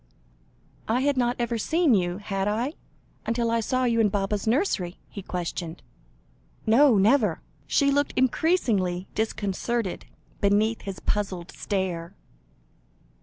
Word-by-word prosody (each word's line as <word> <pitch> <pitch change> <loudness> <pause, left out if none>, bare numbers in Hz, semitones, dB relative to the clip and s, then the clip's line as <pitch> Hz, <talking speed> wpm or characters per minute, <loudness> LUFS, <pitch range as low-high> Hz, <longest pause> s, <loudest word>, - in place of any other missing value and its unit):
"I 235 +3 +1
had 285 +1 +2
not 245 -1 +1
ever 235 -1 -1
seen 320 +3 +2
you, 175 -3 +1
had 195 -1 -2
I, 235 +8 -1 0.5
until 230 0 0
I 230 - +2
saw 255 +3 0
you 235 -2 +2
in 215 -2 +4
Baba's 200 +1 -1
nursery?" 220 - 0
he 200 - -7
questioned. 175 -2 -5 0.8
"No 235 +1 +5
never." 210 - +3 0.3
She 280 -1 +3
looked 285 +1 +1
increasingly 230 - +1
disconcerted, 220 0 -2 0.3
beneath 210 +3 +2
his 195 -2 -7
puzzled 190 -4 -2
stare. 190 -3 -3
215 Hz, 120 wpm, -26 LUFS, 195-245 Hz, 0.8 s, No